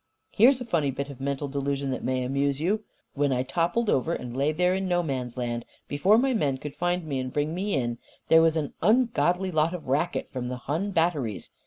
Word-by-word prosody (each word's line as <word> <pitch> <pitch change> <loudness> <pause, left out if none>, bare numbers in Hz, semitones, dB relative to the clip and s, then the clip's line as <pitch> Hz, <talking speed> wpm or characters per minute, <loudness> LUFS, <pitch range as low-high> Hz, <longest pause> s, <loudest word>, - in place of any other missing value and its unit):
"Here 230 +5 +6
is 270 -2 +1
a 250 - -5
funny 165 -10 +1
bit 140 +2 -4
of 135 -1 -11
mental 140 +1 -2
delusion 140 0 -2
that 130 - -4
may 130 0 0
amuse 140 +2 0
you: 205 +7 0 0.3
When 145 -1 +1
I 125 -1 +1
toppled 170 - 0
over 165 0 +1
and 125 -1 -6
lay 140 +3 +2
there 180 +3 +2
in 190 0 -1
No 175 -1 +1
Man's 130 -5 -3
Land, 120 -1 -2 0.2
before 185 +10 +3
my 260 +2 +2
men 145 - +1
could 145 +1 -7
find 175 0 -1
me 140 -4 -2
and 130 0 -4
bring 150 +3 -1
me 195 +3 -1
in, 120 -3 -1 0.3
there 160 0 +7
was 165 0 +3
an 150 -3 -2
ungodly 205 -4 +2
lot 160 +2 +1
of 165 - -9
racket 150 +7 -1
from 125 -2 -4
the 125 0 -4
Hun 155 +10 -2
batteries. 160 - -1
150 Hz, 225 wpm, -26 LUFS, 135-180 Hz, 0.3 s, there